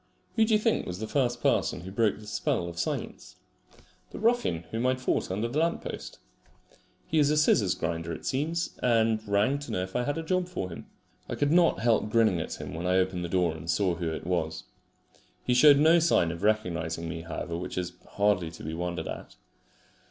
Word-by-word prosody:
Who 225 Hz, -1 st, +4 dB
do 220 Hz, -, +1 dB
you -, -, +3 dB
think 225 Hz, +1 st, +1 dB
was 90 Hz, -, -4 dB
the 110 Hz, -, -4 dB
first 120 Hz, -2 st, 0 dB
person 90 Hz, -, +1 dB
who 95 Hz, +2 st, -8 dB
broke 105 Hz, 0 st, +1 dB
this 105 Hz, 0 st, -10 dB
spell 85 Hz, -, -1 dB
of 85 Hz, -1 st, -7 dB
silence? -, -, -4 dB, 0.7 s
The -, -, -9 dB
ruffian 225 Hz, -, +1 dB
whom 115 Hz, +3 st, 0 dB
I 130 Hz, -, +3 dB
had 130 Hz, -, -6 dB
fought 130 Hz, -, 0 dB
under 105 Hz, +5 st, -1 dB
the 130 Hz, +6 st, -1 dB
lamp 165 Hz, +1 st, 0 dB
post. -, -, -7 dB, 0.9 s
He 160 Hz, -, +1 dB
is 145 Hz, -1 st, +4 dB
a 150 Hz, -, +2 dB
scissors 105 Hz, -11 st, +3 dB
grinder 85 Hz, 0 st, -3 dB
it 80 Hz, -, -7 dB
seems, 160 Hz, +5 st, -1 dB
and 115 Hz, -2 st, +2 dB
rang 105 Hz, +8 st, +2 dB
to 145 Hz, -, -9 dB
know 90 Hz, -, -1 dB
if 95 Hz, -, -8 dB
I 125 Hz, -, +2 dB
had 145 Hz, +5 st, -2 dB
a 165 Hz, -, -3 dB
job 185 Hz, +2 st, 0 dB
for 135 Hz, -, -4 dB
him. 85 Hz, -, -9 dB, 0.4 s
I -, -, -2 dB
could 145 Hz, 0 st, +1 dB
not 170 Hz, 0 st, +4 dB
help 115 Hz, -2 st, +2 dB
grinning 110 Hz, -6 st, +3 dB
at -, -, -5 dB
him -, -, -6 dB
when 85 Hz, +3 st, -3 dB
I 90 Hz, +1 st, +3 dB
opened 90 Hz, -1 st, 0 dB
the 85 Hz, -, -4 dB
door 90 Hz, -3 st, +1 dB
and 80 Hz, +1 st, -9 dB
saw 95 Hz, +1 st, +2 dB
who 85 Hz, 0 st, -3 dB
it 80 Hz, -, -6 dB
was. 80 Hz, -7 st, -2 dB, 0.8 s
He 125 Hz, -, +1 dB
showed 140 Hz, +3 st, +7 dB
no 160 Hz, +4 st, +6 dB
sign 155 Hz, -, +3 dB
of 85 Hz, -, -7 dB
recognising 85 Hz, -6 st, 0 dB
me, 80 Hz, 0 st, -5 dB
however, 85 Hz, +1 st, -5 dB
which 90 Hz, +2 st, -5 dB
is 90 Hz, -1 st, -2 dB, 0.2 s
hardly 100 Hz, -5 st, +2 dB
to -, -, -11 dB
be 80 Hz, -, -4 dB
wondered 85 Hz, +1 st, -3 dB
at. -, -, -7 dB
105 Hz, 220 wpm, -28 LUFS, 85-140 Hz, 0.9 s, showed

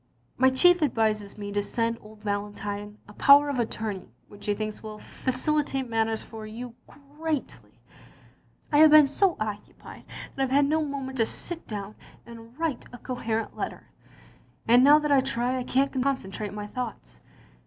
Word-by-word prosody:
My 260 Hz, +1 st, +4 dB
chief 355 Hz, +7 st, +4 dB
advises 215 Hz, -8 st, 0 dB
me 205 Hz, -1 st, -6 dB
to 205 Hz, 0 st, 0 dB
send 230 Hz, +2 st, -1 dB
old 215 Hz, 0 st, -15 dB
Valentine 205 Hz, 0 st, -4 dB
a 210 Hz, -, -13 dB
power 285 Hz, +5 st, +6 dB
of 275 Hz, -3 st, -2 dB
attorney 215 Hz, -, -3 dB, 0.2 s
which 205 Hz, 0 st, -11 dB
he 205 Hz, -, +1 dB
thinks 215 Hz, 0 st, -5 dB
will 215 Hz, -1 st, -8 dB
facilitate 270 Hz, +3 st, -1 dB
matters 225 Hz, -1 st, 0 dB
for 220 Hz, -1 st, -10 dB
you 235 Hz, +2 st, -8 dB, 0.5 s
greatly... 315 Hz, -4 st, -4 dB, 0.9 s
I 295 Hz, -, +4 dB
have 315 Hz, 0 st, +9 dB
been 300 Hz, -1 st, +8 dB
so 360 Hz, +6 st, +1 dB
occupied 210 Hz, -1 st, -7 dB, 0.3 s
that 270 Hz, -, -3 dB
I -, -, +3 dB
've -, -, -8 dB
had 280 Hz, +2 st, +4 dB
no 310 Hz, +2 st, +1 dB
moment 270 Hz, -3 st, -5 dB
to 225 Hz, -, +4 dB
sit 340 Hz, -1 st, -4 dB
down 205 Hz, -1 st, -6 dB, 0.3 s
and 230 Hz, +1 st, -13 dB
write 320 Hz, -6 st, -2 dB
a 245 Hz, -, -9 dB
coherent 230 Hz, -3 st, -3 dB
letter, -, -, -6 dB, 0.8 s
and 240 Hz, +2 st, +6 dB
now 290 Hz, +2 st, +8 dB
that 300 Hz, -1 st, -1 dB
I 275 Hz, -2 st, +5 dB
try 255 Hz, -1 st, -1 dB
I -, -, -3 dB
can't 265 Hz, +1 st, 0 dB
concentrate 215 Hz, -6 st, -2 dB
my 210 Hz, 0 st, -6 dB
thoughts. 210 Hz, -, -7 dB
235 Hz, 170 wpm, -26 LUFS, 215-275 Hz, 0.9 s, have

